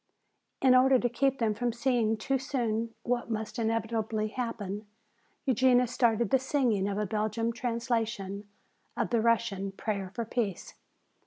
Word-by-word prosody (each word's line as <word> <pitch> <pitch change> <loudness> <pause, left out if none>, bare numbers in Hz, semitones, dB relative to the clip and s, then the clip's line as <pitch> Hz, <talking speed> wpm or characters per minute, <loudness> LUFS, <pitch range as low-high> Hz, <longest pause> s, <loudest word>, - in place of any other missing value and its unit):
In 260 -1 +7
order 260 +1 +6
to 245 0 0
keep 270 +3 +1
them 225 -4 +1
from 240 +3 -1
seeing 235 -2 +1
too 270 +5 0
soon 230 -4 -2
what 240 -1 -1
must 220 0 -3
inevitably 220 -1 -1
happen, 215 -4 -4 0.6
Eugenia 255 -1 +4
started 235 -3 +1
the 265 - +5
singing 250 -7 +1
of 200 - -2
a 210 - 0
Belgian 220 +3 -1
translation 230 -4 -2 0.5
of - - -1
the 235 -2 +3
Russian 220 -4 +1
"Prayer 195 -1 -3
for 235 - -2
Peace." 215 -5 -3
230 Hz, 145 wpm, -29 LUFS, 215-245 Hz, 0.6 s, In